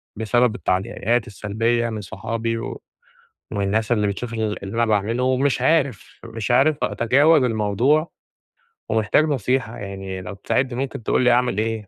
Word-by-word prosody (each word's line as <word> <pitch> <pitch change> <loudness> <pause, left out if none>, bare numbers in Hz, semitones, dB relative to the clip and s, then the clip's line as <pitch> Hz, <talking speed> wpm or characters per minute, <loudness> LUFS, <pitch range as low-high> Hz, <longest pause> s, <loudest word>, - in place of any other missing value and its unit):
بسبب 115 +2 +1
التعليقات 110 +4 -1
السلبيّة 115 +3 -1
من 110 -1 -5
صحابي 110 +3 -3
ومن - - -5 0.9
الناس 110 +3 0
اللي 105 -3 +2
بتشوف 115 +4 -4
اللي 110 -2 -1
أنا 115 +4 -1
باعمله، 110 +3 0
ومش 130 0 +1
عارف 140 - 0
مش 115 0 -5
عارف 140 +5 +4
أتجاوز 140 +6 +3
الموضوع 120 - +1 0.8
ومحتاج 110 +7 +2
نصيحة 130 -4 -1
يعني 95 -1 -6
لو 90 +2 -7
تساعدني 125 +5 -1
ممكن 135 -4 -4
تقول - - +1
لي 125 - +5
أعمل 125 -3 +2
إيه. 110 -1 -2
115 Hz, 140 wpm, -22 LUFS, 105-125 Hz, 0.9 s, لي